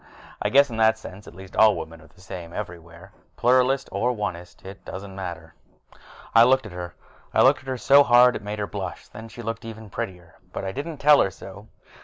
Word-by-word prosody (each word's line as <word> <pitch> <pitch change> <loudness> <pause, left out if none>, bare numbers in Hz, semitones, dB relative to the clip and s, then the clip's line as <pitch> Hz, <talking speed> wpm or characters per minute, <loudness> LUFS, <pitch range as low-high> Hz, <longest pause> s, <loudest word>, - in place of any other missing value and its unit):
I - - 0
guess 140 0 +4
in 115 - -5
that 110 0 +3
sense 100 -2 -11
at - - -12
least, 95 0 -12
women 80 -7 +2
are 80 - -17
the - - -22
same 90 -3 -9
everywhere 85 -1 -9 0.3
Pluralist 130 +2 +2
or 120 +2 0
Onist, 95 -7 -6
it 95 0 -11
doesn't 95 0 -8
matter. 85 -4 -7 0.8
I 115 - +8
looked 130 0 +3
at 110 - -9
her. 90 -1 -7 0.4
I - - +5
looked - - +5
at 135 - -18
her 130 - -2
so 140 +3 +6
hard 125 -2 +6
that - - -5
it - - -15
made 105 +1 -4
her 105 - -2
blush, - - -6
and 110 +2 -9
then - - -12
she 120 +1 -10
looked 115 +1 -5
even 110 -2 -10
prettier. 90 -3 -7
But - - -5
I 95 - -3
didn't 145 +7 -6
tell 145 +1 +5
her - - +1
so. 95 +3 -12
105 Hz, 225 wpm, -24 LUFS, 90-120 Hz, 0.8 s, I